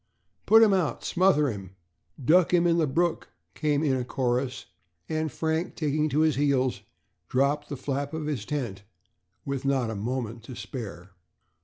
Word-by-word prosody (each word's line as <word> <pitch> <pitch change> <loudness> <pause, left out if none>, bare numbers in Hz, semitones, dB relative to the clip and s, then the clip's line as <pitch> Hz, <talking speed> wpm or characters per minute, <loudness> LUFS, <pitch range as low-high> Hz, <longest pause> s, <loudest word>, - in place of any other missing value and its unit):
"Put 225 +1 +8
him 210 -3 +5
out," 180 -5 0
"Smother 170 -5 +3
him," 95 -3 -9 0.5
"Duck 180 +3 +5
him 175 0 +3
in 170 0 +3
the 160 - +2
brook," 170 +4 0 0.2
came 150 -1 0
in 140 -4 +2
a 125 - -1
chorus; 125 +1 -1 0.4
and 155 -1 -1
Frank, 160 +5 -2
taking 155 0 0
to 150 +2 +1
his 155 -3 +2
heels, 130 -6 +1 0.5
dropped 140 +3 +1
the 145 - -4
flap 140 +2 -3
of 160 -1 -4
his 145 -8 -2
tent, 120 -7 -4 0.6
with 140 -1 -3
not 135 -4 +1
a - - -4
moment 115 +2 -3
to 130 - -8
spare. 100 -5 -7
140 Hz, 165 wpm, -27 LUFS, 125-155 Hz, 0.6 s, Put